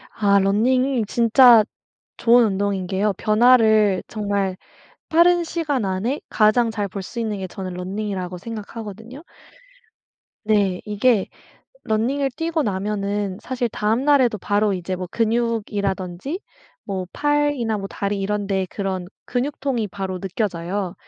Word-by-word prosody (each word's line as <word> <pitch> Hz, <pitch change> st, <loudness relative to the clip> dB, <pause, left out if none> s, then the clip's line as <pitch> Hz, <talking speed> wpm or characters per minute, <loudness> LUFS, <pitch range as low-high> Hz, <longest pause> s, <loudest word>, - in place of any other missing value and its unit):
아 200 Hz, -2 st, +3 dB
running이 240 Hz, +5 st, +2 dB
진짜 235 Hz, 0 st, +6 dB, 0.5 s
좋은 240 Hz, 0 st, +5 dB
운동인 200 Hz, -2 st, -1 dB
게요. 200 Hz, +2 st, 0 dB
변화를 220 Hz, -3 st, +4 dB
정말 200 Hz, -3 st, -2 dB, 0.5 s
빠른 345 Hz, +1 st, +4 dB
시간 300 Hz, -8 st, -2 dB
안에 195 Hz, +9 st, -1 dB
가장 225 Hz, +2 st, +3 dB
잘 210 Hz, -2 st, -3 dB
볼 195 Hz, +1 st, -6 dB
수 235 Hz, +5 st, -6 dB
있는 215 Hz, -3 st, -2 dB
게 190 Hz, -, -4 dB
저는 185 Hz, 0 st, -7 dB
running이라고 185 Hz, -1 st, -4 dB
생각하거든요. 225 Hz, -, -8 dB, 1.2 s
네 205 Hz, -4 st, +1 dB
이게 210 Hz, 0 st, +2 dB, 0.6 s
running을 265 Hz, +6 st, 0 dB
뛰고 325 Hz, 0 st, -1 dB
나면은 200 Hz, -1 st, -2 dB
사실 250 Hz, -2 st, -2 dB
다음날에도 240 Hz, +2 st, +2 dB
바로 205 Hz, +2 st, +1 dB
이제 185 Hz, 0 st, -3 dB
뭐 180 Hz, 0 st, -5 dB
근육이라든지 220 Hz, -, -1 dB, 0.4 s
뭐 190 Hz, -3 st, -4 dB
팔이나 290 Hz, -7 st, 0 dB
뭐 195 Hz, 0 st, -5 dB
다리 200 Hz, 0 st, -3 dB
이런 205 Hz, +1 st, -2 dB
데 190 Hz, -1 st, 0 dB
그런 190 Hz, -3 st, -3 dB, 0.2 s
근육통이 250 Hz, -3 st, -2 dB
바로 190 Hz, -2 st, -5 dB
느껴져요. 190 Hz, -1 st, -3 dB
210 Hz, 315 characters per minute, -22 LUFS, 195-240 Hz, 1.2 s, 진짜